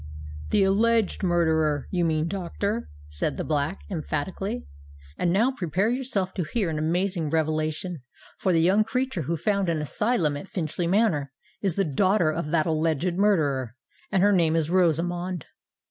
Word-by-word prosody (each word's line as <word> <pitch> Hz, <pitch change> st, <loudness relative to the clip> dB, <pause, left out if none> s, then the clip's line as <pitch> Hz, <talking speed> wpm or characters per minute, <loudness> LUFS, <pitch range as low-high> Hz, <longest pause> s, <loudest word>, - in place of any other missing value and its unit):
"The 195 Hz, -, +3 dB
alleged 220 Hz, +2 st, +2 dB
murderer, 160 Hz, -5 st, +1 dB
you 175 Hz, -2 st, +1 dB
mean, 155 Hz, 0 st, +1 dB
doctor," 200 Hz, +5 st, -3 dB, 0.2 s
said 75 Hz, -1 st, -3 dB
the -, -, -2 dB
Black, 150 Hz, +4 st, -1 dB
emphatically. 190 Hz, +6 st, -3 dB, 0.5 s
"And 175 Hz, -, 0 dB
now 225 Hz, +8 st, +3 dB
prepare 190 Hz, -, 0 dB
yourself 245 Hz, -8 st, -1 dB
to 180 Hz, -, -2 dB
hear 185 Hz, +1 st, -1 dB
an 155 Hz, -, -2 dB
amazing 170 Hz, +1 st, 0 dB
revelation—for 155 Hz, +1 st, -2 dB
the 165 Hz, -2 st, +3 dB
young 195 Hz, +5 st, +4 dB
creature 250 Hz, -3 st, -2 dB
who 165 Hz, +4 st, -2 dB
found 200 Hz, +2 st, 0 dB
an 165 Hz, -, +1 dB
asylum 155 Hz, -, 0 dB
at 145 Hz, -, -8 dB
Finchley 170 Hz, -1 st, -2 dB
Manor, 175 Hz, -8 st, +2 dB, 0.3 s
is 190 Hz, -5 st, 0 dB
the 195 Hz, -, +1 dB
daughter 175 Hz, +3 st, +2 dB
of 155 Hz, -1 st, -3 dB
that 155 Hz, -1 st, +2 dB
alleged 160 Hz, +1 st, 0 dB
murderer, 145 Hz, -, +1 dB, 0.4 s
and 195 Hz, -2 st, +3 dB
her 205 Hz, 0 st, +5 dB
name 165 Hz, -3 st, +3 dB
is 165 Hz, 0 st, 0 dB
Rosamond." 175 Hz, -1 st, +1 dB
175 Hz, 155 wpm, -26 LUFS, 155-195 Hz, 0.5 s, her